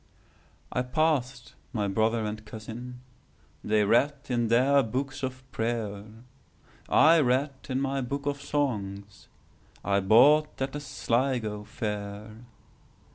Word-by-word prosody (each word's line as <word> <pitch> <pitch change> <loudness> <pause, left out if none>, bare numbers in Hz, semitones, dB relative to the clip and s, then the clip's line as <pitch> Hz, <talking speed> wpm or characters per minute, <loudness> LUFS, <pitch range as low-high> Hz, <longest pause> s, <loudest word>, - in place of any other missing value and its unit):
I 125 - 0
passed 125 -2 -1 0.2
my 105 -4 0
brother 110 +3 +1
and 105 0 -5
cousin:They 115 -1 -5
read 135 +8 +3
in 120 -2 +1
their 130 +5 +4
books 130 +4 -3
of 130 -1 -4
prayer;I 115 +8 -1
read 135 +1 +1 0.2
in 130 0 0
my 135 0 -1
book 140 +3 -4
of 145 0 -1
songsI 105 -9 -3 0.8
bought 145 +8 +5
at 135 0 -1
the 145 - -3
Sligo 120 -6 -1
fair. 105 -1 -5
125 Hz, 105 wpm, -27 LUFS, 110-135 Hz, 0.8 s, bought